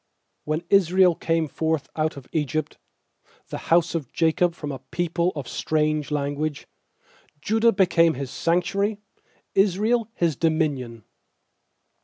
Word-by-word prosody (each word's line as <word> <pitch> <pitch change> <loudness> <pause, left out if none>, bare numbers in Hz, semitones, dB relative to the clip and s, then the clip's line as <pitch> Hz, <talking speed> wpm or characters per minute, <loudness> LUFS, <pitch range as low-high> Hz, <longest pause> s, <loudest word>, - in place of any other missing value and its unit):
When 155 +2 -1
Israel 185 -1 +5
came 165 -1 0
forth 160 0 -1
out 155 -1 -1
of 135 - -10
Egypt, 155 0 -2 0.7
The - - -5
house 170 0 +3
of 155 -7 -4
Jacob 165 +1 +1
from 150 -4 -5
a 135 - -6
people 175 +1 -1
of 140 -4 -5
strange 155 +2 0
language; 145 0 -2 0.8
2Judah 225 +2 +3
became 170 -4 +4
His 135 0 -5
sanctuary, 190 +5 0 0.6
Israel 210 +4 +2
His 165 -4 +1
dominion. 140 -8 -1
160 Hz, 120 wpm, -24 LUFS, 150-180 Hz, 0.8 s, Israel